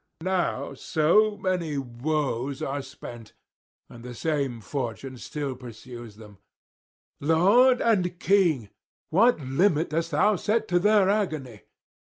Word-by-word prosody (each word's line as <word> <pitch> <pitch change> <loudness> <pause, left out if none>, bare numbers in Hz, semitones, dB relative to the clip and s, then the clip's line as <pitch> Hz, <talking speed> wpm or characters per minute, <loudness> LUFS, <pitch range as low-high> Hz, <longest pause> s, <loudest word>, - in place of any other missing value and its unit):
Now 175 -7 -1
so 190 +10 +2
many 175 -6 -2
woes 135 0 -2
are 140 +1 -2
spent, 120 -4 -11 0.5
and 120 -1 -13
the 125 0 -8
same 140 -5 -1
fortune 130 +2 -5
still 140 -1 -4
pursues 120 -2 -10
them; 105 -2 -14 0.8
Lord 200 - +4
and 185 -6 +1
King, 170 - +2 0.4
what 225 +4 +4
limit 155 +5 +1
dost 165 +1 -1
thou 205 +6 +2
set 220 +4 0
to 175 0 +3
their 205 0 +4
agony? 155 - -2
150 Hz, 120 wpm, -26 LUFS, 125-185 Hz, 0.8 s, Lord